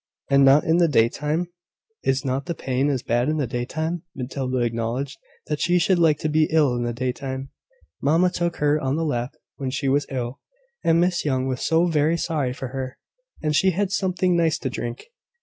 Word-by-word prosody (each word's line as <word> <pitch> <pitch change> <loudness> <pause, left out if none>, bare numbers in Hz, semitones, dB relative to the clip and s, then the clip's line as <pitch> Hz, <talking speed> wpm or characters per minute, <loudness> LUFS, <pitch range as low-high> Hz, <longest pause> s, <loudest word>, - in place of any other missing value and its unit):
And 140 0 +6
not 135 +2 +6
in 160 +1 +2
the 175 -1 +4
daytime? 150 +6 +1 0.5
Is 135 +1 0
not 135 +1 -2
pain 130 +2 0
as 130 -3 -1
bad 120 +4 +1
in 155 - 0
the 145 - 0
daytime? 155 +8 -3
Matilda 130 0 -3
acknowledged 120 +3 -2 0.3
that 150 -1 -2
she 180 0 +3
should 180 +1 +3
like 160 -3 +4
to - - 0
be 155 0 +3
ill 150 -6 +3
in 120 - -2
the 120 0 -1
daytime. 130 +2 -4 0.5
Mamma 165 +5 +3
took 170 -1 -1
her 150 +1 +2
on 135 +2 0
her 165 - 0
lap 125 -5 -2 0.2
when 135 -2 -3
she 135 +1 -2
was 140 +2 +2
ill; 125 -1 -4 0.4
and 165 0 +4
Miss 175 0 +1
Young 130 -3 0
was 130 -1 -3
so 165 +2 +3
very 160 0 +2
sorry 150 -7 -1
for 130 0 -6
her; 130 0 -5 0.5
and 150 -1 +1
she 190 - +4
had 200 +2 0
something 185 -2 +1
nice 165 -2 +2
to 130 - -4
drink. 120 -1 -5
145 Hz, 200 wpm, -23 LUFS, 130-160 Hz, 0.5 s, And